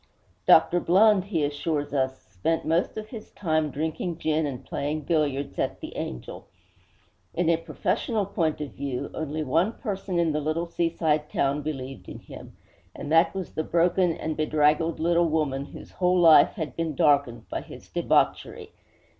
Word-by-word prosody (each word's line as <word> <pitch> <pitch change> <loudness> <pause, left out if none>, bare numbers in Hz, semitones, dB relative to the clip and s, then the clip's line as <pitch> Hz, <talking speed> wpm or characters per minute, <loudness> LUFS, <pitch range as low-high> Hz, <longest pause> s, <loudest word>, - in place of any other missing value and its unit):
Dr. 170 +2 +6
Blund, 195 +2 +4
he 170 -7 -1
assures 145 0 -2
us, 130 -1 0
spent 100 - -2
most 165 +6 0
of 215 0 -6
his 220 -2 -9
time 155 -5 -1
drinking 160 +4 -3
gin 155 -1 0
and 130 -2 -7
playing 150 +2 -3
billiards 145 -3 -1
at - - -1
'The - - -8
Angel.' 60 - -6 0.9
In 170 -1 +1
a 165 - +3
professional 210 +5 -2
point 165 -5 -1
of 145 - -5
view, 135 -3 -4
only 155 0 -3
one 165 - +1
person 195 -6 -4
in 170 -2 +2
the 150 0 -1
little 155 +3 -1
seaside 160 -3 0
town 140 +2 0
believed 135 -4 -6
in - - -8
him, - - -12 0.4
and 145 - -6
that 165 +3 +4
was 190 -2 -4
the 155 - -2
broken 175 +1 +2
and 160 -1 -3
bedraggled 155 +1 +1
little 170 +1 +2
woman 145 -3 -1
whose - - -12
whole 180 0 +1
life 165 -3 +7
had 155 -5 -5
been 165 -3 -2
darkened 140 -7 +2
by - - -4
his - - -12
debauchery. - - 0
155 Hz, 165 wpm, -26 LUFS, 145-170 Hz, 0.9 s, life